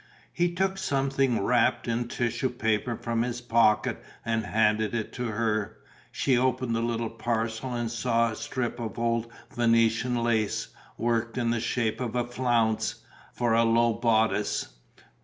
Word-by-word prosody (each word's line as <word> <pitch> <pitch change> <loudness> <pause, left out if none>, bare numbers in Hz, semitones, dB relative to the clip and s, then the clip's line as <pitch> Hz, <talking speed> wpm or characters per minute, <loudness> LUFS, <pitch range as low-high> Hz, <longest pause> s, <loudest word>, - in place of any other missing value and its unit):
He 175 0 +1
took 190 +1 0
something 135 - +1
wrapped 120 +2 +2
in 120 +1 -1
tissue 120 +1 -1
paper 115 0 -1
from 115 0 -2
his 120 0 -2
pocket 115 -3 +2 0.2
and 110 -2 -1
handed 110 0 +2
it 110 -2 -3
to 125 - -3
her. 110 -2 -1 0.3
She 130 - +1
opened 125 -1 +1
the 115 - 0
little 115 -1 -1
parcel 115 +1 -2
and 120 -1 -2
saw 115 -1 +1
a - - -6
strip 120 0 -3
of 110 -4 -5
old 115 0 0 0.2
Venetian 115 +1 +2
lace, 110 -3 0 0.3
worked 115 0 -1
in 120 -2 +1
the 120 - 0
shape 115 0 -1
of 125 -1 -3
a 120 -1 +1
flounce, 120 -3 +1 0.4
for 120 -2 0
a 115 +1 +4
low 115 0 +3
bodice. 110 -2 +1
115 Hz, 155 wpm, -27 LUFS, 115-120 Hz, 0.4 s, a